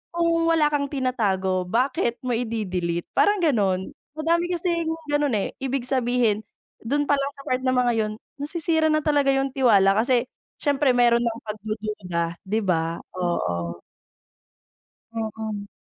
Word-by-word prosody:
kung 335 -1 +2
wala 320 -3 +3
kang 285 -1 0
tinatago, 200 -9 0
bakit 240 +2 +1
mo 255 - -2
ide-delete? 185 -8 -2
Parang 410 -3 +3
gano'n. 200 - +1 0.2
Madami 340 +3 +1
kasing 340 -1 -1 0.2
ganun, 290 -4 +2
eh. 200 - -1
Ibig 265 -1 -2
sabihin, 245 -4 +1 0.4
dun 285 +6 0
palang 280 -1 +1
sa 275 - -11
part 255 -1 -1
na 255 - +3
mga 245 -1 +3
'yon, 215 -1 0 0.3
nasisira 320 +2 0
na 310 0 +2
talaga 290 -2 +2
yung 270 0 +1
tiwala 205 -7 +4
kasi 245 +2 +2 0.3
siyempre 285 -2 +3
meron 240 -1 +4
ng 230 0 -2
pagdududa, 210 -6 -4
'di 215 +4 0
ba? 165 -4 0 0.2
Oo. 85 - -2 1.3
Mm. 220 -2 -4
245 Hz, 135 wpm, -24 LUFS, 205-285 Hz, 1.3 s, tiwala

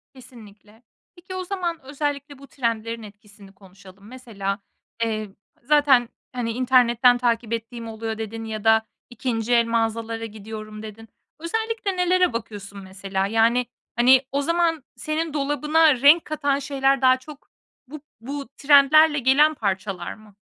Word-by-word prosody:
Kesinlikle. 220 -3 -16 0.3
Peki, 365 +2 -10
o 370 - -3
zaman 350 -3 -3
özellikle 285 0 -4
bu 275 0 -14
trendlerin 230 -2 -3
etkisini 205 -1 -15
konuşalım. 195 +1 -17
Mesela, 210 -6 -5 0.4
eee, 215 -2 -2 0.3
zaten, 275 -4 +4 0.2
hani, 235 -2 -2
"İnternetten 245 0 +4
takip 235 -2 -1
ettiğim 230 0 -5
oluyor." 220 0 -5
dedin. 225 +1 -6
"Ya 215 -1 -6
da 220 0 +4 0.2
2. 240 -1 -2
el 235 -1 +4
mağazalara 230 0 -2
gidiyorum." 215 0 -9
dedin. 220 +1 -11 0.3
Özellikle 440 +2 -3
nelere 360 -4 +2
bakıyorsun, 205 -3 -7
mesela? 190 +1 -3
Yani, 230 +3 +2 0.3
hani, 250 +2 +6
o 280 +1 0
zaman 335 -1 0
senin 310 0 -3
dolabına 295 -1 +2
renk 305 +4 +6
katan 285 -2 -1
şeyler 275 -1 0
daha 255 0 +5
çok 290 +2 -14 0.4
bu 300 +1 -10 0.2
bu 280 +2 -6
trendlerle 295 +2 +5
gelen 285 +5 +4
parçalar 195 -5 -3
mı? 215 -2 -18
240 Hz, 135 wpm, -23 LUFS, 220-290 Hz, 0.4 s, hani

